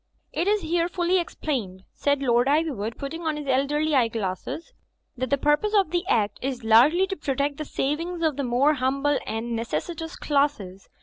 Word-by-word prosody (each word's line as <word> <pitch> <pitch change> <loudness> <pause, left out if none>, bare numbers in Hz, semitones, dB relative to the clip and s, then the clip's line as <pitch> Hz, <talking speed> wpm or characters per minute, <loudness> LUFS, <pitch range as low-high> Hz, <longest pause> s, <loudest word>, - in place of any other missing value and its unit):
"It 345 - -1
is 420 0 +2
here 340 +1 0
fully 360 +1 +1
explained," 230 - -4
said 285 -1 0
Lord 240 0 +3
Iv3rwood, 275 -8 0
putting 280 +4 -5
on 315 -2 -1
his 295 - -6
elderly 290 +4 +1
eyeglasses, 230 - -1 0.4
"that 255 0 -3
the 280 - +2
purpose 295 +10 +1
of 390 -6 +3
the 350 0 0
Act 205 - +1
is 255 -2 -3
largely 255 +12 +5
to 385 0 -4
protect 280 -2 -1
the 305 - -4
savings 330 +6 -2
of 315 -3 +2
the 280 - -2
more 255 +4 +3
humble 275 +1 +1
and 230 +1 -3
necessitous 325 +8 -4
classes. 275 -11 -1
285 Hz, 175 wpm, -25 LUFS, 245-325 Hz, 0.4 s, largely